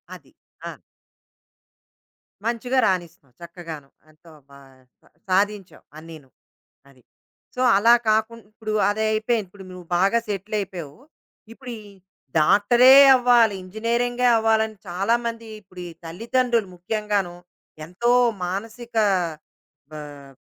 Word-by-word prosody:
అది. - - -18 0.4
ఆ! - - -15 1.7
మంచిగా 240 +3 -2
రానిస్తున్నావు, 170 -8 -4
చక్కగాను 170 -4 -10 0.2
ఎంతో 160 +2 -20 0.2
బా 140 0 -16 0.4
సా - - -27 0.2
సాధించావు 200 0 -1
అన్నీను. 155 -3 -13 0.6
అది. 130 -2 -23 0.5
సో, 250 - -3 0.2
అలా 230 +4 +5 0.2
కాకుం 220 +2 0
ఇప్పుడు 215 0 -6 0.2
అదయిపోయింది 215 +1 -1
ఇప్పుడు 195 +1 -14
నువ్వు 180 -1 -11
బాగా 195 +6 +2
సెటిలైయిపోయావు, 195 -6 -5 0.6
ఇప్పుడు 250 +1 -10
ఈ - - -15 0.6
డాక్టరే 240 +10 +5 0.2
అవ్వాలి, 240 -4 +3
ఇంజినీరింగే 235 +5 -1
అవ్వాలని 220 -1 0
చాలామంది 230 +5 -2
ఇప్పుడు 185 -2 -13
ఈ - - -9
తల్లిదండ్రులు 230 +5 -1
ముఖ్యంగానూ 200 -1 -3 0.5
ఎంతో 215 +8 -1 0.3
మానసిక 225 +6 -7 1.0
ఆహ్, 145 -2 -11
210 Hz, 100 wpm, -22 LUFS, 175-230 Hz, 1.7 s, అలా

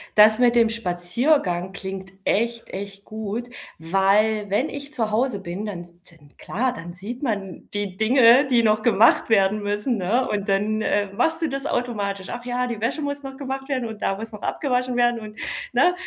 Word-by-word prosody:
das 215 +1 +7
mit 245 -1 +4
dem 230 -1 +5
Spaziergang 185 - 0
klingt 190 -1 -7
echt, 230 +3 0
echt 200 +1 -7
gut, 220 +2 -5 0.3
weil 200 +5 +2
wenn 210 +10 +1
ich 285 0 -7
zu 230 -7 -1
Hause 225 -1 +1
bin, 185 +5 -5
dann 180 -4 -5 0.3
dann 145 -4 -20
klar, 245 +5 -1
dann 175 -7 -8
sieht 220 +7 -7
man 200 -8 -4
die 205 -2 -3
Dinge, 240 +5 +5
die 240 -3 +3
noch 215 -1 +3
gemacht 225 0 +4
werden 205 -1 +3
müssen, 205 +4 -1
ne? 225 +8 +1
Und 205 0 -2
dann, 210 +2 +1
äh, 205 -2 0
machst 325 +10 0
du - - +2
das 275 0 -3
automatisch. 200 -6 -2
Ach 240 - -6
ja, 245 0 -1
die 235 -4 -5
Wäsche 275 +7 -1
muss 285 0 -3
noch 270 -1 -8
gemacht 270 0 -5
werden 255 -4 -1
und 220 -1 -9
da 195 - 0
muss 225 +2 -7
noch 210 - -10
abgewaschen 250 -3 -1
werden 240 -1 +3
und 215 0 -10 0.4
ne? 360 - +4
220 Hz, 190 wpm, -23 LUFS, 200-250 Hz, 0.4 s, das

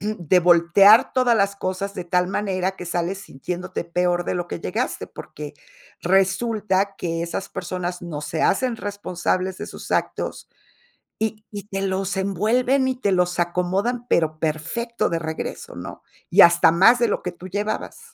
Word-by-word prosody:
de 185 -4 +1
voltear 180 +6 +6
todas 250 -2 +3
las 200 -1 +1
cosas 195 +1 -3
de 180 - -5
tal 180 +1 +1
manera 190 -2 -1
que 180 - -8
sales 175 +2 -2
sintiéndote 180 +1 -5
peor 175 0 0
de - - -1
lo 175 0 -3
que - - -5
llegaste, - - -3
porque 150 0 -9 0.5
resulta 195 +1 +1
que 165 -1 -2
esas 190 +3 -4
personas 180 0 -4
no 160 -4 -6
se 155 +2 -3
hacen 250 +3 +2
responsables 190 -3 -2
de - - -6
sus - - -9
actos - - -2 0.7
y 215 0 -3
y 205 -1 -7
te 195 -1 -4
los 190 0 -1
envuelven 240 +8 +1
y 260 - 0
te 200 -5 +1
los 180 -1 +1
acomodan, 190 +8 -1
pero 155 -2 +1
perfecto 165 +10 -2
de 165 - -1
regreso, 160 -1 -5
¿no? - - -8 0.3
Y - - +6
hasta 170 -1 +7
más 225 +8 +6
de 235 - +3
lo 205 - -1
que 180 - -4
tú 180 +1 -11
llevabas. 205 - -3
185 Hz, 165 wpm, -22 LUFS, 175-205 Hz, 0.7 s, hasta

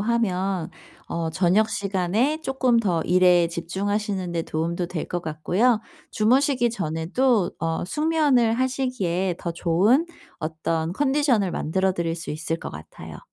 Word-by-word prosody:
하면 195 -6 0 0.4
어 165 -1 -3
저녁 185 +6 +2
시간에 205 - 0
조금 260 -4 +2
더 180 -7 0
일에 180 -1 +4
집중하시는 190 +2 -2
데 165 - -1
도움도 170 +3 -2
될 170 -3 -5
것 175 -1 -3
같고요. 185 +9 +1 0.3
주무시기 250 +3 +2
전에도 195 +4 0
어 165 -1 -1
숙면을 295 - +2
하시기에 235 -9 -1
더 170 - -4
좋은 185 - +3 0.3
어떤 160 0 -2
컨디션을 265 -5 +2
만들어 190 +4 0
드릴 170 -2 -2
수 165 - -6
있을 160 +2 -2
것 - - -6
같아요. 75 +1 -10
190 Hz, 285 characters per minute, -24 LUFS, 170-235 Hz, 0.4 s, 일에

